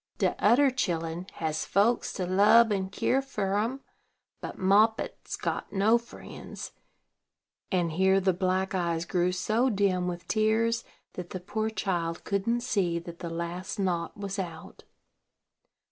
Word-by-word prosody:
De -, -, +2 dB
oder 260 Hz, +6 st, +5 dB
chilen 170 Hz, -6 st, -2 dB
has 155 Hz, -1 st, -2 dB
folks 220 Hz, +5 st, +2 dB
to 185 Hz, -, -3 dB
lub 210 Hz, +5 st, +5 dB
an 190 Hz, -2 st, -1 dB
kere 260 Hz, +6 st, +1 dB
fer 200 Hz, -7 st, -2 dB
em, 245 Hz, +6 st, -2 dB, 0.6 s
but -, -, -6 dB
Moppet's 210 Hz, +4 st, +2 dB
got -, -, -3 dB
no 215 Hz, +4 st, +4 dB
friends;" 235 Hz, -, -9 dB, 1.0 s
and 175 Hz, -3 st, +1 dB
here 190 Hz, +3 st, +3 dB
the 190 Hz, -1 st, +2 dB
black 185 Hz, +1 st, 0 dB
eyes 170 Hz, -2 st, -1 dB
grew 180 Hz, +1 st, +1 dB
so 220 Hz, +7 st, +1 dB
dim 195 Hz, -4 st, +1 dB
with 175 Hz, -1 st, -5 dB
tears 225 Hz, +2 st, +1 dB, 0.3 s
that 180 Hz, -1 st, -7 dB
the 185 Hz, -, -5 dB
poor 220 Hz, +4 st, -2 dB
child 175 Hz, -6 st, -2 dB
couldn't 220 Hz, +5 st, 0 dB
see 195 Hz, -8 st, 0 dB
that 170 Hz, 0 st, -8 dB
the 170 Hz, -, -5 dB
last 170 Hz, +4 st, -4 dB
knot 180 Hz, -3 st, -1 dB
was 200 Hz, 0 st, -4 dB
out. 170 Hz, -4 st, -7 dB
190 Hz, 145 wpm, -28 LUFS, 175-220 Hz, 1.0 s, oder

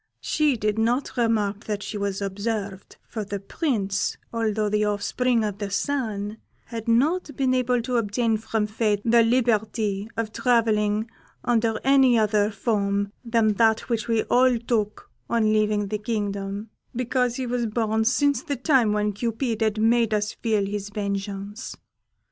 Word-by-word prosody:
She 300 Hz, -5 st, +1 dB
did 215 Hz, 0 st, -1 dB
not 240 Hz, +5 st, 0 dB
remark 215 Hz, -4 st, 0 dB
that 205 Hz, -2 st, -3 dB
she -, -, -6 dB
was 200 Hz, -1 st, -2 dB
observed, 200 Hz, 0 st, -4 dB
for 220 Hz, -2 st, -4 dB
the 200 Hz, 0 st, -4 dB
Prince, 200 Hz, -, -1 dB, 0.2 s
although 220 Hz, -2 st, 0 dB
the 210 Hz, 0 st, +1 dB
offspring 220 Hz, +3 st, +1 dB
of 205 Hz, -1 st, -3 dB
the 205 Hz, -1 st, -3 dB
Sun, 215 Hz, -3 st, -2 dB, 0.3 s
had 230 Hz, -1 st, -7 dB
not 295 Hz, +10 st, +2 dB
been 260 Hz, -1 st, +1 dB
able 250 Hz, -2 st, +1 dB
to 250 Hz, 0 st, 0 dB
obtain 225 Hz, +1 st, +1 dB
from 220 Hz, 0 st, -1 dB
fate 210 Hz, -1 st, 0 dB
the 235 Hz, 0 st, +5 dB
liberty 220 Hz, -3 st, +1 dB
of 225 Hz, -1 st, -2 dB
travelling 220 Hz, -3 st, +2 dB, 0.4 s
under 225 Hz, -2 st, +1 dB
any 265 Hz, -3 st, +5 dB
other 210 Hz, -1 st, +2 dB
form 200 Hz, -2 st, -1 dB
than 230 Hz, -2 st, +2 dB
that 220 Hz, 0 st, +2 dB
which 230 Hz, -2 st, -1 dB
we 225 Hz, -1 st, +2 dB
all 250 Hz, 0 st, +3 dB
took 225 Hz, -3 st, -2 dB, 0.2 s
on 220 Hz, -2 st, +2 dB
leaving 210 Hz, -1 st, +1 dB
the 210 Hz, 0 st, -2 dB
kingdom, 205 Hz, -1 st, -3 dB, 0.2 s
because 250 Hz, 0 st, 0 dB
he 260 Hz, -, -3 dB
was 240 Hz, -1 st, -1 dB
born 220 Hz, 0 st, 0 dB
since 285 Hz, +5 st, +2 dB
the 290 Hz, -4 st, -3 dB
time 255 Hz, -5 st, +3 dB
when 210 Hz, 0 st, 0 dB
Cupid 230 Hz, +2 st, -2 dB
had 215 Hz, -1 st, +1 dB
made 225 Hz, 0 st, +3 dB
us 210 Hz, 0 st, -1 dB
feel 215 Hz, -4 st, 0 dB
his 205 Hz, 0 st, -4 dB
vengeance. 200 Hz, 0 st, -4 dB
220 Hz, 155 wpm, -24 LUFS, 205-235 Hz, 0.4 s, the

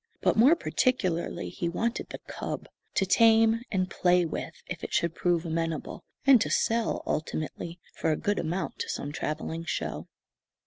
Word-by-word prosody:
But -, -, +2 dB
more 260 Hz, +9 st, +7 dB
particularly 200 Hz, -, 0 dB
he 170 Hz, -, -3 dB
wanted 230 Hz, +8 st, -2 dB
the -, -, -6 dB
cub, -, -, -5 dB, 0.3 s
to 195 Hz, -, +3 dB
tame 225 Hz, +2 st, +5 dB
and 185 Hz, -3 st, +1 dB
play 180 Hz, -1 st, +3 dB
with 160 Hz, -, -5 dB
if -, -, -6 dB
it -, -, -5 dB
should 170 Hz, -1 st, +1 dB
prove 175 Hz, -1 st, +1 dB
amenable, 165 Hz, -1 st, -3 dB, 0.2 s
and 265 Hz, -5 st, +7 dB
to -, -, +1 dB
sell, 230 Hz, 0 st, +1 dB
ultimately, 160 Hz, +2 st, -3 dB
for 160 Hz, -, 0 dB
a 155 Hz, -, +1 dB
good 205 Hz, 0 st, 0 dB
amount, 170 Hz, +2 st, -3 dB
to -, -, -3 dB
some 145 Hz, -, -3 dB
travelling 160 Hz, +2 st, -3 dB
show. 165 Hz, -, -3 dB
180 Hz, 165 wpm, -28 LUFS, 165-225 Hz, 0.3 s, more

